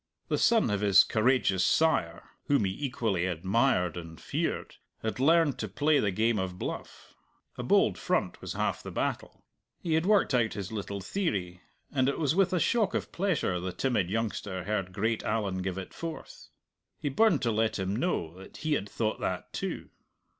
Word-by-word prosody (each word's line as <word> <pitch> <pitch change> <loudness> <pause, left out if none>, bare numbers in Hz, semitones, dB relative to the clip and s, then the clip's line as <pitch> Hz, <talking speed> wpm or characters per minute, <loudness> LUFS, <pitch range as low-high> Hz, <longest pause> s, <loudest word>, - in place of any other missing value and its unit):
The - - +1
son 225 - +4
of 100 -1 0
his 100 -3 +7
courageous 110 -5 +2
sire 95 - +2 0.2
(whom 140 -8 +3
he 95 - 0
equally 110 -10 0
admired 95 - +1
and 80 -2 -8
feared) - - -3 0.3
had 110 +2 -2
learned 160 0 +4
to 110 - -2
play 145 +9 +2
the 105 - +1
game 110 +3 +1
of 90 -1 -3
bluff. - - -7 0.4
A - - -5
bold - - +3
front - - -1
was - - -5
half - - -1
the - - -7
battle. - - -3 0.3
He 165 - -2
had 160 +3 +2
worked 205 -8 +4
out 120 -3 +2
his 100 -1 -5
little 100 -2 -4
theory, 95 - -2 0.3
and 130 -1 +2
it 140 - -2
was 150 -2 +1
with 195 +1 +3
a 180 - +1
shock 210 +5 +2
of - - -2
pleasure 170 - 0
the 90 +1 -3
timid 105 -2 0
youngster 105 -3 -2
heard 95 -2 -2
great 110 +4 -1
Allan 105 -4 -1
give 95 0 -3
it 95 - -7
forth. 165 -1 -8 0.5
He 150 - -3
burned 175 +2 +3
to 120 - +2
let 110 0 +1
him 95 +1 -2
know 110 - -1
that 95 - -12
he 155 -1 -1
had 105 -8 -1
thought 110 0 -2
that - - -3
too. - - -4
110 Hz, 185 wpm, -29 LUFS, 95-145 Hz, 0.5 s, his